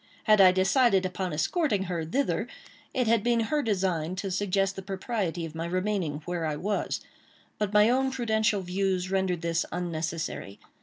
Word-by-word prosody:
Had 215 Hz, -2 st, +5 dB
I 185 Hz, -1 st, +8 dB
decided 195 Hz, +1 st, +3 dB
upon 185 Hz, 0 st, -3 dB
escorting 200 Hz, -, 0 dB
her 175 Hz, -3 st, -3 dB
thither, 265 Hz, -, -1 dB, 0.4 s
it 255 Hz, -2 st, 0 dB
had 230 Hz, -1 st, +3 dB
been 235 Hz, -1 st, +2 dB
her 295 Hz, +7 st, 0 dB
design 185 Hz, -, -1 dB
to 190 Hz, +1 st, -4 dB
suggest 195 Hz, 0 st, 0 dB
the 195 Hz, -, -5 dB
propriety 190 Hz, -3 st, -3 dB
of 160 Hz, -, -8 dB
my 165 Hz, +1 st, -4 dB
remaining 180 Hz, -5 st, -1 dB
where 175 Hz, -2 st, -2 dB
I 150 Hz, -, -1 dB
was; 200 Hz, +7 st, -2 dB, 0.6 s
but 210 Hz, -2 st, 0 dB
my 210 Hz, 0 st, +6 dB
own 265 Hz, +2 st, +2 dB
prudential 220 Hz, -5 st, +1 dB
views 185 Hz, 0 st, -1 dB
rendered 190 Hz, -3 st, 0 dB
this 170 Hz, 0 st, +1 dB
unnecessary. 165 Hz, -, -4 dB
190 Hz, 165 wpm, -28 LUFS, 175-215 Hz, 0.6 s, I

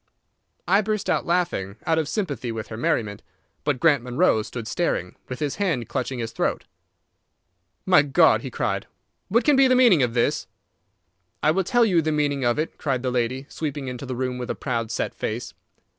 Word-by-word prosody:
I 200 Hz, -, +4 dB
burst 215 Hz, -1 st, -1 dB
out -, -, 0 dB
laughing, 170 Hz, -, 0 dB
out 160 Hz, 0 st, +2 dB
of 155 Hz, -2 st, -2 dB
sympathy 140 Hz, -, -2 dB
with 110 Hz, -1 st, -6 dB
her 110 Hz, -, -6 dB
merriment; 110 Hz, -7 st, -1 dB, 0.4 s
but 145 Hz, -3 st, 0 dB
Grant 145 Hz, -4 st, +4 dB
Munro 120 Hz, -2 st, +2 dB
stood 115 Hz, +1 st, -7 dB
staring, 100 Hz, -, -1 dB
with 125 Hz, -, -4 dB
his 150 Hz, -3 st, -2 dB
hand 165 Hz, -, 0 dB
clutching 130 Hz, -1 st, -2 dB
his 115 Hz, -1 st, -4 dB
throat. -, -, -1 dB, 1.2 s
"My 180 Hz, -5 st, +6 dB
God!" 140 Hz, -2 st, +4 dB
he -, -, -5 dB
cried. -, -, -2 dB, 0.4 s
"What 235 Hz, +5 st, +2 dB
can 295 Hz, -, +4 dB
be 270 Hz, 0 st, +6 dB
the 255 Hz, -, +4 dB
meaning 235 Hz, -, +6 dB
of 120 Hz, -1 st, 0 dB
this?" 120 Hz, -, +1 dB, 1.0 s
"I 155 Hz, -, +5 dB
will 190 Hz, +4 st, +1 dB
tell 240 Hz, +5 st, +3 dB
you 180 Hz, -6 st, +3 dB
the 155 Hz, 0 st, -1 dB
meaning 145 Hz, -2 st, 0 dB
of 120 Hz, -1 st, +2 dB
it," 155 Hz, +2 st, -3 dB
cried 130 Hz, -4 st, -1 dB
the 130 Hz, -, 0 dB
lady, 125 Hz, +2 st, -1 dB
sweeping 145 Hz, -4 st, -4 dB
into 125 Hz, +1 st, -6 dB
the 130 Hz, -, -3 dB
room 125 Hz, 0 st, -2 dB
with 125 Hz, -, -5 dB
a -, -, -1 dB
proud, 115 Hz, -4 st, -2 dB
set 115 Hz, -, -2 dB
face. 110 Hz, +3 st, -4 dB
135 Hz, 195 wpm, -24 LUFS, 120-170 Hz, 1.2 s, My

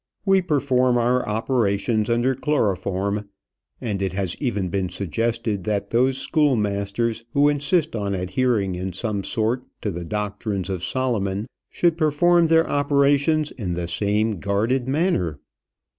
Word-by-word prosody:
We 195 Hz, -1 st, +4 dB
perform 130 Hz, -6 st, +2 dB
our 125 Hz, 0 st, +1 dB
operations 110 Hz, -1 st, 0 dB
under 120 Hz, +3 st, +2 dB
chloroform; 100 Hz, -6 st, -1 dB, 0.5 s
and 100 Hz, -4 st, -3 dB
it 95 Hz, -1 st, -1 dB
has 95 Hz, -3 st, -2 dB
even 105 Hz, -9 st, -1 dB
been 95 Hz, 0 st, -1 dB
suggested 100 Hz, +3 st, -2 dB
that 100 Hz, -1 st, -2 dB
those 130 Hz, +3 st, +2 dB
schoolmasters 115 Hz, -, 0 dB
who 145 Hz, +1 st, +4 dB
insist 150 Hz, +2 st, 0 dB
on 100 Hz, -2 st, -1 dB
adhering 95 Hz, +2 st, 0 dB
in 90 Hz, +1 st, -4 dB
some 100 Hz, +1 st, -2 dB
sort 115 Hz, +5 st, 0 dB, 0.2 s
to 105 Hz, -, -1 dB
the 85 Hz, 0 st, -5 dB
doctrines 100 Hz, 0 st, -3 dB
of 90 Hz, -2 st, -4 dB
Solomon 105 Hz, -6 st, -1 dB, 0.2 s
should 170 Hz, -1 st, +1 dB
perform 170 Hz, +2 st, +4 dB
their 165 Hz, 0 st, +4 dB
operations 145 Hz, +2 st, +2 dB
in 90 Hz, -7 st, -4 dB
the 85 Hz, 0 st, -3 dB
same 105 Hz, +3 st, 0 dB
guarded 110 Hz, +7 st, 0 dB
manner. 130 Hz, -, 0 dB
110 Hz, 135 wpm, -23 LUFS, 100-135 Hz, 0.5 s, We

